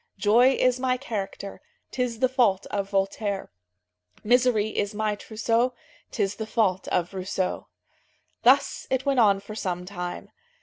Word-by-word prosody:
"Joy 235 +6 +5
is 255 0 +3
my 255 0 +1
character, 200 -6 -5 0.3
'Tis 245 -2 -2
the 255 - +5
fault 235 -7 +2
of 200 -1 -2
Voltaire; 195 0 -1 0.7
Misery 240 -2 +3
is 205 -1 -2
my 215 0 0
trousseau, 230 +4 0 0.3
'Tis 200 -2 -2
the 220 - -4
fault 195 -5 +1
of 175 +1 -1
Rousseau." 185 0 -3 0.7
Thus - - +3
it 260 0 0
went 275 -2 +2
on 200 -4 +5
for 200 +2 -10
some 180 -4 -3
time. 180 -2 -6
215 Hz, 140 wpm, -26 LUFS, 195-245 Hz, 0.7 s, Joy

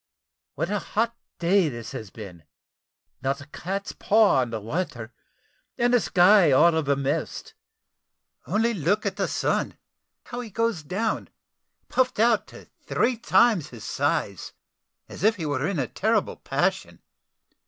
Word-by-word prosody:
What 165 +7 -2
a 210 - 0
hot 230 +4 -1 0.2
day 175 0 +3
this 120 -1 -7
has 110 -7 -7
been 95 -6 -11 0.8
not 135 +2 -1
a 140 - -10
cat's 195 +7 -5
paw 215 -7 +3
on 125 - -2
the 115 -1 -4
water, 115 - -4 0.6
and 240 +1 +2
the 245 - +6
sky 185 -4 +5
all 170 +6 +5
of 160 -3 -1
a 140 - +4
mist. 140 0 -3 0.9
Only 225 +6 +1
look 200 +4 0
at 200 -1 -2
the 195 - 0
sun, - - -1 0.5
how 245 - -7
he 240 -2 -6
goes 225 -4 -1
down, 195 +9 -2 0.6
puffed 255 -4 0
out 230 -1 +3
to - - -14
three 250 +1 0
times 225 - +3
his 115 -4 -11
size, - - -2 0.5
as - - -9
if 220 +2 +4
he 170 -6 -5
were 145 -1 -1
in 195 - -2
a 130 -4 -1
terrible - - 0
passion. - - -2
180 Hz, 155 wpm, -25 LUFS, 140-215 Hz, 0.9 s, the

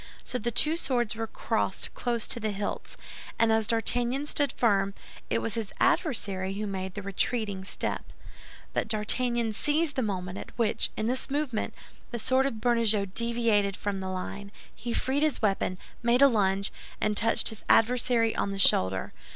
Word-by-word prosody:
So 250 - -3
the 235 - -1
two 305 +7 +2
swords 245 -9 0
were 225 0 -3
crossed - - -2
close 235 -2 -1
to - - 0
the 215 -1 -1
hilts, 205 0 -4 0.4
and 230 -1 +3
as 220 -1 +2
D'Artagnan 245 +4 0
stood 290 -1 +1
firm, 200 -4 +2 0.3
it - - 0
was 225 - -2
his 220 -2 -3
adversary 195 - +1
who 210 +1 -3
made 190 -1 -4
the 205 - -5
retreating 200 0 -1
step; 190 - -3 0.7
but - - 0
D'Artagnan 230 +1 +1
seized 295 +5 0
the 260 - +1
moment 185 -4 -3
at - - -10
which, 230 -3 +2
in 215 - -1
this 255 +4 -1
movement, 275 -5 -1 0.3
the 240 - -4
sword 260 +3 +2
of 275 - -3
Bernajoux 220 -4 +2
deviated 230 -4 +2
from 200 -2 -3
the 190 0 -4
line. 195 +2 -5 0.2
He 235 +1 -5
freed 265 +4 0
his 310 -2 +1
weapon, 195 -3 0 0.2
made 240 +3 +4
a - - +10
lunge, 200 -4 +1 0.3
and 215 0 +1
touched 225 +2 +2
his 220 - -7
adversary 230 -1 +3
on - - 0
the 195 - -4
shoulder. 95 - +4
225 Hz, 175 wpm, -28 LUFS, 200-245 Hz, 0.7 s, a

